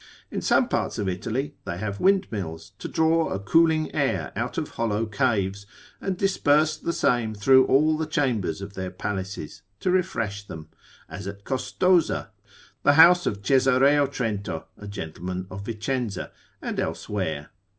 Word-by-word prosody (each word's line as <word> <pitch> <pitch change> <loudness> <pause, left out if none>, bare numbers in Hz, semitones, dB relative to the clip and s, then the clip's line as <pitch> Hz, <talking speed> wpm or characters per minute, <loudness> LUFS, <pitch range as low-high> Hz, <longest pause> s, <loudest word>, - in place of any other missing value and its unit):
In - - -3
some - - +3
parts - - -1
of 100 - -2
Italy 115 +9 -2
they 85 - -4
have 100 +1 -4
windmills, 100 - 0
to - - -5
draw 160 0 +2
a - - -2
cooling 155 +10 +2
air - - 0
out - - -3
of - - -2
hollow 115 -1 -1
caves, 100 -4 0 0.3
and 190 -2 -2
disperse 155 -5 +3
the 170 - -3
same 120 -8 +1
through 130 +5 +5
all 155 +4 +4
the 155 0 -2
chambers 115 - -1
of 100 0 -8
their 95 -1 -4
palaces, 95 -3 -5 0.2
to 185 - 0
refresh 115 - -1
them; 80 -1 -9 0.4
as 95 +4 -7
at 100 0 -7
Costoza, 160 - +1 0.5
the 145 - +5
house 175 +3 +7
of 100 -1 -3
Caesareo 135 +3 +4
Trento, 110 -7 -3
a 105 - -10
gentleman 90 -1 -5
of 100 +1 -7
Vicenza, 115 -1 -3 0.3
and - - -3
elsewhere. 80 -8 -3
115 Hz, 150 wpm, -25 LUFS, 100-150 Hz, 0.5 s, house